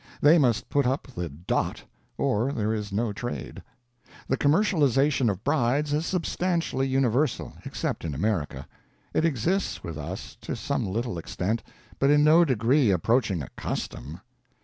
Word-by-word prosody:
They 155 +4 +6
must 120 -7 +2
put 140 -3 +2
up 135 +2 -1
the 85 -1 -3
"dot," 75 +6 -2 0.3
or 115 +6 +1
there 110 -4 -1
is 105 -2 -4
no 105 +1 -1
trade. 100 - -5 0.7
The 135 - +2
commercialization 145 - +3
of 100 -1 -3
brides 145 +1 +1
is 155 +3 0
substantially 170 -6 0
universal, 130 +1 +1
except - - -3
in 80 -4 -3
America. 75 -7 -2 0.5
It 160 - +2
exists 165 - 0
with 80 -3 -6
us, 70 - -7
to - - -4
some - - -2
little 110 -1 -2
extent, 100 +7 -2 0.4
but 135 - +3
in 145 0 +5
no 160 +3 +7
degree 130 -2 +3
approaching 100 - +1
a - - -8
custom. - - -5
125 Hz, 150 wpm, -26 LUFS, 100-145 Hz, 0.7 s, no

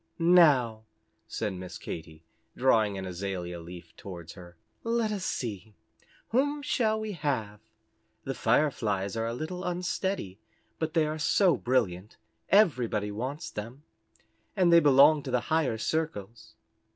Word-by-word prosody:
"Now," 145 -11 +4 0.4
said 105 -3 -3
Miss 90 -1 -8
Katy, 80 0 -8 0.3
drawing 110 -6 +3
an 95 - -5
azalia 90 -1 -5
leaf 85 -1 -11
towards 85 -4 -9
her, 85 -3 -13 0.3
"let 230 -1 0
us 200 -3 -3
see 110 - -4 0.5
whom 285 +4 +1
shall 220 -6 +1
we 215 -1 -4
have? 130 - -3 0.6
The - - -3
Fireflies 105 -10 0
are 115 0 -1
a 115 - -3
little 180 +7 -5
unsteady, 180 - -3 0.4
but 160 0 -3
they 160 -2 +4
are 155 +1 -3
so 175 +2 +3
brilliant, 110 -7 -1 0.3
everybody 125 - +3
wants 130 +10 -5
them 115 +7 -7 0.7
and 175 -3 +4
they 170 - +9
belong 145 0 +6
to 135 - -7
the 125 -1 +2
higher 150 -8 +1
circles." 115 -6 -4
125 Hz, 135 wpm, -28 LUFS, 100-165 Hz, 0.7 s, they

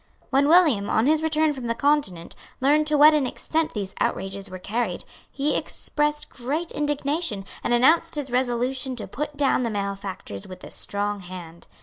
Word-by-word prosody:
When 275 +1 +4
William, 305 - +5
on 220 - +2
his 310 +2 +3
return 315 -1 +2
from 260 -4 -6
the 230 - 0
Continent, 280 - 0 0.3
learned 295 +3 +3
to 300 -1 +2
what 300 +2 +8
an 290 -4 +2
extent 320 +3 -1
these 195 -2 -3
outrages 195 +1 -2
were 185 - -7
carried, 205 -1 -2 0.3
he 285 +2 0
expressed 295 0 -1
great 295 +7 -3
indignation, 295 - -1 0.2
and - - -1
announced 315 +7 +4
his 285 -4 -3
resolution 255 +1 0
to 230 - -6
put 295 +1 -5
down 275 -2 +2
the 235 - 0
malefactors 200 - -5
with 185 -1 -11
a - - -9
strong 205 0 -2
hand. 175 -2 -10
260 Hz, 170 wpm, -24 LUFS, 200-300 Hz, 0.3 s, what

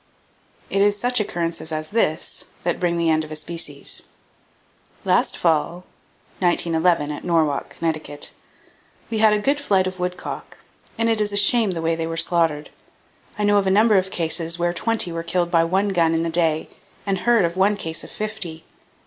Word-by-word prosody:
It 195 - +2
is 205 0 +3
such 245 +1 +1
occurrences 170 -5 -3
as 155 0 -4
this 205 -8 -1 0.2
that 175 -1 -1
bring 175 -1 +1
the 165 -1 +2
end 155 0 +2
of 155 - -9
a - - -4
species: 155 -3 -5 1.0
"Last - - +2
fall 170 +2 +1 0.5
[1911, 170 -3 +2
at 145 - -6
Norwalk, 160 -5 0
Conn.] 165 -1 +1 1.2
we 220 - 0
had 215 0 +6
a - - +3
good 280 +8 +1
flight 195 -9 +2
of 185 0 -4
woodcock, 180 0 -5 0.4
and 230 0 +1
it 225 -1 +2
is 205 -1 0
a 205 - -1
shame 215 +2 +4
the 165 -3 -3
way 165 0 +2
they 165 0 -3
were 165 0 -4
slaughtered. 165 -3 +1 0.7
I 210 - -1
know 205 0 +4
of 195 - -1
a - - +4
number 210 +1 +5
of 185 +1 -3
cases 165 -1 -1
where 175 0 0
twenty 225 -2 -1
were 165 0 -3
killed 175 +1 -1
by 165 -1 +4
one 190 +4 +1
gun 165 -4 +2
in 165 - +1
the 165 - -2
day, 160 -2 +1 0.4
and 195 -2 0
heard 230 -1 +3
of 170 +1 -2
one 200 +2 +3
case 165 -4 -4
of - - -10
fifty. 200 -7 -5
175 Hz, 190 wpm, -22 LUFS, 165-205 Hz, 1.2 s, had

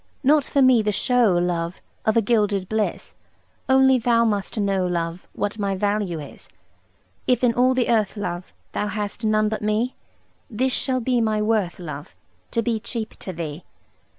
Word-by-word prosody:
Not 290 +2 +5
for 280 - +2
me 255 -3 +6
the 210 0 0
show, 230 -3 +2
love, 175 0 -1 0.3
Of 220 - +3
a 230 - +4
gilded 205 -4 +1
bliss; 220 0 -2 0.6
Only 265 -1 +5
thou 235 -1 +3
must 205 0 -1
know, 195 -2 +1
love, 170 0 -3
What 205 +1 -3
my 200 -1 0
value 200 -3 -1
is. 145 -2 -9 0.8
If 250 -1 +2
in 240 -2 +4
all 255 +2 +3
the 250 -2 +1
earth, 220 -3 +1
love, 180 -3 -4 0.2
Thou 210 - -2
hast 210 +2 -4
none 215 0 +2
but 215 0 -3
me, 215 +4 0 0.6
This 255 +3 0
shall 255 -2 +1
be 245 0 +1
my 215 -1 +1
worth, 210 -4 0
love: 150 -4 -8 0.3
To 230 - 0
be 230 -1 0
cheap 225 0 -4
to 185 - -5
thee. 160 -1 -6
215 Hz, 175 wpm, -23 LUFS, 190-235 Hz, 0.8 s, me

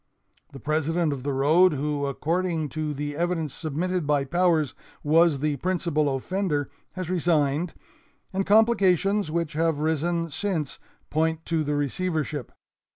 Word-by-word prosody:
The 135 - -10
president 155 +2 0
of 135 - -6
the 140 +2 -2
road 155 +7 +4
who, 145 0 -1
according 165 +2 -1
to 155 +2 -3
the 145 0 -4
evidence 165 -3 -1
submitted 170 +2 -2
by 145 -2 +2
Powers, 165 -2 +2 0.3
was 155 -1 +4
the 150 -1 0
principal 155 -4 0
offender, 150 0 -1 0.3
has 185 -2 -5
resigned, 165 -2 +1 0.6
and 195 +1 +1
complications 200 -3 +3
which 165 0 -2
have 160 0 +1
risen 160 +2 0
since 165 -4 -2 0.3
point 160 +1 0
to 165 -2 0
the 150 0 -1
receivership. 150 -1 -2
160 Hz, 135 wpm, -25 LUFS, 145-175 Hz, 0.6 s, road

